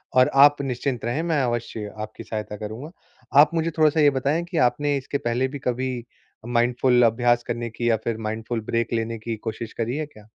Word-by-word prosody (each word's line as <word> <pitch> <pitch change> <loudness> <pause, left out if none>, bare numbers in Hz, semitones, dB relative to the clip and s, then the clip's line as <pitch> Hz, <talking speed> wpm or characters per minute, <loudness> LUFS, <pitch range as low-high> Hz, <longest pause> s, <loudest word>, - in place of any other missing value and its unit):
और 130 0 +6
आप 145 +1 +6
निश्चिंत 125 -2 -3
रहें, 120 +7 -1
मैं 165 -4 +1
अवश्य 115 -3 -3
आपकी 110 +1 -7
सहायता 105 -1 -5
करूँगा। 110 +9 -7 0.5
आप 155 - +3
मुझे 165 0 0
थोड़ा-सा 155 0 +4
ये 150 -1 +6
बताएँ 140 +5 0
कि 180 - -3
आपने 145 +3 +2
इसके 135 +1 -3
पहले 120 +1 0
भी 140 +2 -7
कभी 130 +1 -1 0.5
माइंडफुल 120 +1 +3
अभ्यास 120 +1 +2
करने 120 0 -3
की 120 +1 -2
या 115 - +3
फिर 115 -1 -2
माइंडफुल 110 +1 -3
ब्रेक 115 0 0
लेने 115 0 -1
की 115 +1 -4
कोशिश 110 +1 -6
करी 115 +2 -2
है 155 - -2
क्या? 110 -8 -17
120 Hz, 195 wpm, -24 LUFS, 115-140 Hz, 0.5 s, और